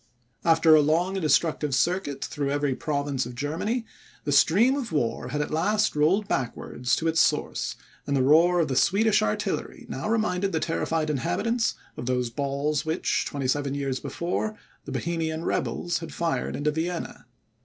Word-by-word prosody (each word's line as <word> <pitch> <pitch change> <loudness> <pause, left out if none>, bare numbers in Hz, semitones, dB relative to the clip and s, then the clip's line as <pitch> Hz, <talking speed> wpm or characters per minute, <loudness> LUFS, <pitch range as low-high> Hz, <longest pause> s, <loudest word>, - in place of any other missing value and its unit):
After 165 -1 +5
a 155 - +7
long 165 +6 +1
and 190 - -2
destructive 150 -1 +2
circuit 145 -3 0
through 145 -1 -3
every 145 -1 0
province 140 -2 -2
of 125 - -9
Germany, 170 - -2 0.4
the 145 - -2
stream 195 - +5
of 265 -8 -4
war 125 -5 -1
had 150 +4 -2
at 150 - -3
last 205 +7 +1
rolled 180 +8 +2
backwards 125 - -1
to 165 - -2
its 160 0 +3
source, - - 0 0.3
and 140 -1 +1
the 130 - +3
roar 170 +6 +5
of 165 - +2
the 135 - -2
Swedish 215 - +3
artillery 105 0 -2
now 135 +11 -4
reminded 200 -4 0
the 160 - +1
terrified 160 -1 -1
inhabitants 225 - 0 0.2
of 120 - -5
those 125 -2 0
balls 140 +3 -1
which, 160 0 0
twenty 140 -3 -3
seven 140 +1 0
years 135 -2 -2
before, 215 +5 -3 0.3
the - - -7
Bohemian 165 -1 -2
rebels 175 -1 -1
had 165 - -8
fired 165 -7 -2
into 150 +1 0
Vienna. 165 +3 -4
155 Hz, 170 wpm, -26 LUFS, 140-175 Hz, 0.4 s, a